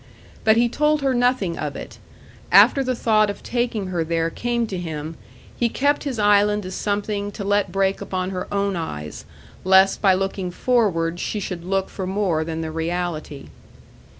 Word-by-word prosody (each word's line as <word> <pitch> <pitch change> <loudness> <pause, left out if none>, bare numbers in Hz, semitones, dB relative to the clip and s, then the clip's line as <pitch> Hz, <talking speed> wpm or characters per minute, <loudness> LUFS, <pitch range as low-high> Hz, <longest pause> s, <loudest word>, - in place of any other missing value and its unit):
But 220 0 +4
he 240 +1 +4
told 300 +4 +1
her 270 -1 +2
nothing 245 -8 +1
of - - -4
it. - - -9 0.5
After 275 - +6
the 255 -1 -1
thought 215 -2 +2
of 205 - -6
taking 235 -5 -2
her 175 -3 -1
there 165 0 -1
came 240 +3 -1
to 190 -4 -5
him, 160 -2 -5 0.4
he 235 - +1
kept 285 +5 0
his 265 -4 -3
island 205 -1 +3
as 185 - -6
something 205 0 -2
to 200 - -6
let 205 -1 +1
break 195 +1 0
upon 185 -1 -3
her 185 -1 -5
own 200 -1 0
eyes, 75 - -6 0.4
lest 190 +1 +4
by 190 -3 +5
looking 195 -1 -2
forward 175 -6 0
she 210 - -3
should 180 -3 -5
look 190 +1 -1
for 190 -2 -6
more 190 -5 0
than 160 0 -4
the 160 -1 -4
reality. 165 -3 -4
195 Hz, 180 wpm, -22 LUFS, 175-220 Hz, 0.5 s, After